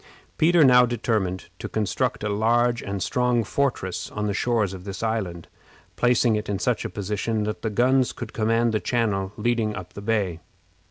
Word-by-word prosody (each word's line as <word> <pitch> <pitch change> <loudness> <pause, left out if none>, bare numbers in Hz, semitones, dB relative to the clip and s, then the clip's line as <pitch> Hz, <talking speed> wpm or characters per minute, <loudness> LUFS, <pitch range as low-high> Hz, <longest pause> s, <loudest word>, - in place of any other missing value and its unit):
Peter 170 +1 +5
now 125 -2 +7
determined 110 -6 -1
to - - -5
construct 105 -1 -1
a 105 - -1
large 120 +3 +2
and 100 -1 -3
strong 125 -1 +1
fortress 120 -6 -2
on 105 0 -3
the 105 - 0
shores 110 -2 0
of 90 -1 -8
this 100 +2 -6
island, 100 -7 -2 0.5
placing 120 -2 +3
it 105 -1 -3
in 100 - 0
such 95 - 0
a - - -3
position 105 +2 -2
that 105 0 -3
the 110 - -1
guns 125 +4 +2
could 120 - -8
command 115 +1 +1
the 110 - 0
channel 105 -6 -1
leading 115 -1 0
up 90 -4 -8
the 100 - -8
bay. 100 -6 -1
110 Hz, 180 wpm, -24 LUFS, 100-120 Hz, 0.5 s, now